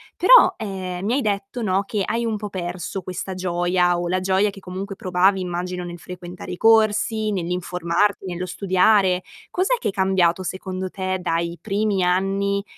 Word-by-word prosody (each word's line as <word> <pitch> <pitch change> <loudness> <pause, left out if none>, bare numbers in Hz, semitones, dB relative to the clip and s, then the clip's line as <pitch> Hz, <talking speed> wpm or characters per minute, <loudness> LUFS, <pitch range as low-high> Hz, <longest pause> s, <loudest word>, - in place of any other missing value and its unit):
Però, - - +7
ehm, 185 -3 -5
mi 225 - +1
hai 280 - +1
detto, 205 +1 -2
no, 195 -2 +1
che 205 +1 -2
hai 230 +2 -1
un 225 -2 -1
po' 210 0 -5
perso 180 0 -4
questa 185 +1 -5
gioia 175 -1 +1
o 175 - -2
la 185 +1 0
gioia 190 +2 +2
che 195 - -13
comunque 190 +2 -6
provavi, 185 +1 +2
immagino, 180 0 -3
nel 175 0 -7
frequentare 180 0 -9
i - - -4
corsi, 220 0 +3
nell'informarti, 180 +2 -1
nello 180 -1 -4
studiare. 185 0 +3 0.3
Cos'è 380 +7 +1
che - - -1
è - - -2
cambiato, 190 -2 +2
secondo 185 0 -4
te, 185 0 -2
dai 170 0 -1
primi 205 -1 0
anni 195 +2 +1
185 Hz, 170 wpm, -22 LUFS, 180-200 Hz, 0.3 s, Però